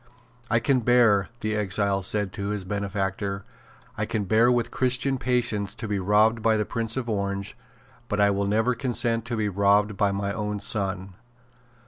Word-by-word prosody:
"I 115 - +3
can 130 +3 +2
bear," 115 -4 +3
the 110 0 -1
exile 100 -1 0
said 100 0 0
to 100 -2 -4
his 105 -2 -3
benefactor, 100 0 -3 0.5
"I - - -2
can 105 - -2
bear 110 +5 +3
with 120 -1 0
Christian 130 +1 0
patience 115 -5 0
to 115 - -6
be 100 -1 -1
robbed 105 +4 +3
by 110 0 +3
the 105 - 0
Prince 115 +1 -1
of 125 -2 -3
Orange; 100 -2 -2 0.5
but 105 - -2
I 100 0 +5
never 100 +4 +1
will - - -2
consent 115 -2 0
to 120 -2 -3
be 105 -1 0
robbed 100 +1 +2
by 100 0 +2
my 100 0 -2
own 105 -1 -3
son." 95 -2 -2
105 Hz, 175 wpm, -25 LUFS, 100-115 Hz, 0.5 s, I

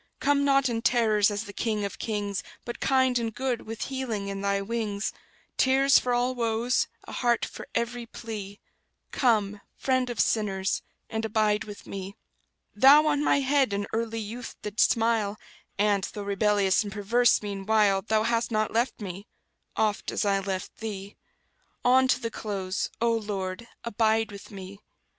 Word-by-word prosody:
Come 280 0 +2
not 275 -1 +4
in 230 -2 -1
terrors, 220 -4 +3
as 205 0 -3
the 205 -2 -10
King 215 -1 -1
of 200 - -6
kings; 205 -3 -2 0.2
But 240 - -6
kind 260 -2 +3
and 230 -1 -2
good, 245 +1 -3
with 225 0 -4
healing 235 -7 -3
in 195 0 -4
Thy 200 0 +1
wings: 210 -1 -2 0.4
Tears 270 +1 +5
for 250 - -2
all 245 +1 +1
woes, 235 0 +1 0.2
a - - -11
heart 240 -1 +1
for - - -9
every 235 0 -2
plea; 205 -4 -7 0.5
Come, 210 -5 +1
Friend 255 -1 0
of 240 -4 -5
sinners, 195 -3 +1 0.3
and 220 0 -3
abide 215 -1 +1
with 205 -1 -10
me! 195 0 -7 0.6
Thou 275 +7 +7
on 295 -1 +2
my 280 - +3
head 270 -4 +2
in 200 0 -1
early 225 0 -1
youth 225 +3 -6
didst 210 +1 +2
smile, 225 -3 +1 0.4
And, 205 -1 +2
though 205 - -6
rebellious 200 0 +2
and 205 - -6
perverse 215 +4 +3
meanwhile 200 0 +2
Thou 215 +1 +1
hast 230 +1 +1
not 215 -2 0
left 235 +1 0
me, 195 +1 -7 0.5
oft 215 -2 0
as - - -1
I 200 -1 +2
left 190 -1 -4
Thee; 205 -2 -6 0.7
On 260 +1 +5
to 255 - +2
the 230 -2 -4
close, 195 -4 -3
O 235 0 +3
Lord, 205 -1 -3 0.2
abide 225 -1 +1
with 200 -1 -10
me! 195 0 -9
220 Hz, 165 wpm, -27 LUFS, 200-240 Hz, 0.7 s, Thou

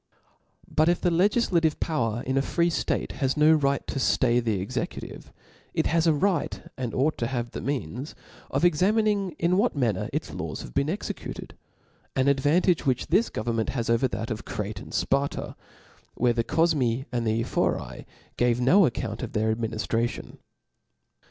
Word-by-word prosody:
But 155 +2 +2
if 175 - +2
the 175 - +1
legiflative 175 -3 +2
power 120 -7 -1
in 130 - -1
a 135 - +3
free 170 +4 +1
ftate, - - -1
has 135 0 -1
no 155 +1 +6
right 140 -3 +1
to 135 - -3 0.2
(lay 120 0 +3
the 110 -5 0
executive, 125 +7 -5 0.4
it - - +1
has 165 0 +2
a 160 - +5
right 175 0 0 0.2
and 125 -3 -4
ought 145 +4 +1
to 115 - 0
have 120 -1 -3
the - - -6
means 135 - -4 0.3
of - - +1
examining 195 +2 +2
in 175 +2 +2
what 220 0 +2
manner 115 -9 0
its - - -3
laws - - -5
have - - -10
bpen 140 - +1
executed; 195 +6 -5 0.6
an 130 +1 +2
advantage 150 +6 +3
which 130 -3 0
this 230 - +3
government 115 0 -2
has 115 -1 0
over 115 +3 +3
that 115 -2 -4
of 110 - -4
Crete 105 0 -4
and - - -11
Sparta, 140 +1 -1 0.6
where 120 0 +2
the 115 0 0
Cofmi 135 -6 +1
and 120 -2 -1
the 110 +1 +1
Ephori - - -2 0.3
gave 120 -1 +2
no 165 +10 +5
account 120 - -4
of 125 - -5
their 110 0 +1
adminidration. 115 +1 -2
135 Hz, 170 wpm, -26 LUFS, 115-165 Hz, 0.6 s, no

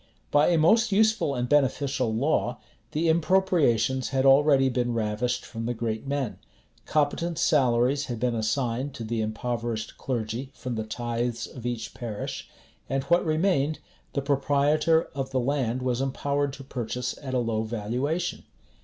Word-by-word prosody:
By 145 +1 +5
a 175 - +3
most 220 +9 +4
useful 215 -8 +3
and 125 0 -1
beneficial 135 -3 +1
law, 120 0 0 0.3
the 160 +2 0
impropriations 160 - +2
had 135 0 +1
already 135 0 +6
been 120 -2 0
ravished 110 +2 -1
from 115 -1 -5
the 120 - -1
great 110 +2 -3
men: 140 -4 -2 0.5
competent 155 +3 0
salaries 140 -4 +3
had 120 -5 -5
been 125 0 +1
assigned 120 +4 -1
to 115 - -6
the 115 0 -2
impoverished 115 0 -3
clergy 120 +1 -3
from 125 - -5
the 110 -1 -3
tithes 120 +1 -2
of 120 -2 -7
each 120 -2 -4
parish: 110 -4 -5 0.4
and 135 0 0
what 170 +6 +3
remained, 155 -2 +1 0.4
the 140 - -1
proprietor 145 +3 +2
of 135 -1 -3
the 130 -1 0
land 130 -2 0
was 125 0 0
empowered 140 +1 -1
to 135 - -9
purchase 125 -1 -4
at 130 -2 -4
a - - +3
low 115 -3 0
valuation. 120 +9 -2
130 Hz, 155 wpm, -26 LUFS, 120-145 Hz, 0.5 s, already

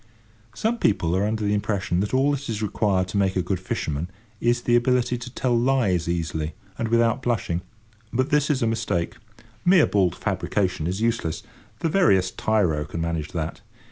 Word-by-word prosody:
Some 230 +2 0
people 90 - +2
are 100 +2 +1
under 110 0 -2
the 105 0 +1
impression 100 -4 0
that 100 +2 -1
all 135 +2 +3
that 140 -2 -3
is 110 -1 -2
required 100 -3 +1
to 100 - -2
make 95 -1 +1
a 90 - +1
good 95 -1 -1
fisherman 80 -3 -3 0.3
is 120 +1 +1
the 120 - +3
ability 125 0 +2
to 120 +1 -8
tell 125 -1 0
lies 115 -9 +2
easily 80 -2 -2 0.2
and 115 - 0
without 115 +2 +2
blushing; 110 -8 -1 0.5
but 130 +3 0
this 150 0 +3
is 135 -4 +1
a - - +3
mistake. 110 -7 -1 0.5
Mere 180 -2 +6
bald 95 -4 +1
fabrication 90 -6 -1
is 95 +4 -2
useless; 115 -9 -1 0.4
the - - +1
veriest 155 - +3
tyro 90 -9 +1
can 75 +3 -6
manage 80 -2 -2
that. 80 -1 -3
105 Hz, 180 wpm, -24 LUFS, 90-120 Hz, 0.5 s, Mere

